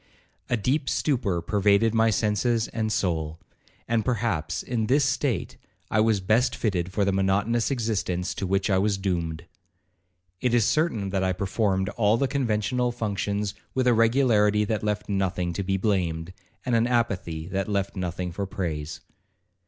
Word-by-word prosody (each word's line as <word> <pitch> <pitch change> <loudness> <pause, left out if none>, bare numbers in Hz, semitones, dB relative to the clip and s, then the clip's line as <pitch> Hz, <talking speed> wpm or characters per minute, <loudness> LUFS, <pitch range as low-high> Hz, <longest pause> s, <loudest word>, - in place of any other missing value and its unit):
A 120 - +2
deep 135 +6 0
stupor 105 - 0
pervaded 105 +3 +3
my 115 0 +4
senses 110 +2 +1
and 110 -1 -2
soul; 80 -5 -1 0.5
and 115 -1 +1
perhaps, 105 -10 -1
in 115 -3 -1
this 140 +3 +3
state, 130 - -1 0.3
I 110 - +2
was 110 -1 +3
best 110 +6 +2
fitted 95 -5 -1
for 100 +1 +1
the 100 - +2
monotonous 100 +4 +1
existence 100 -7 -1
to 95 - -3
which 95 +2 +1
I 95 - +3
was 100 0 +1
doomed. 85 -4 -2 0.9
It 120 +1 +1
is 115 -4 +4
certain 115 - 0
that 95 -1 0
I 95 0 +1
performed 95 0 0
all 105 0 +2
the 135 - +1
conventual 125 -2 0
functions 105 -3 -2 0.2
with 130 -1 +1
a 125 - +5
regularity 110 -3 +3
that 110 0 -1
left 105 0 -2
nothing 95 -3 -1
to 90 - -2
be 95 0 0
blamed, 90 -4 -1 0.3
and 125 - 0
an 115 0 +3
apathy 100 -10 -1
that 95 +1 -2
left 100 -1 -1
nothing 90 -1 -3
for 100 +3 -4
praise. 80 -6 -4
105 Hz, 160 wpm, -26 LUFS, 95-115 Hz, 0.9 s, a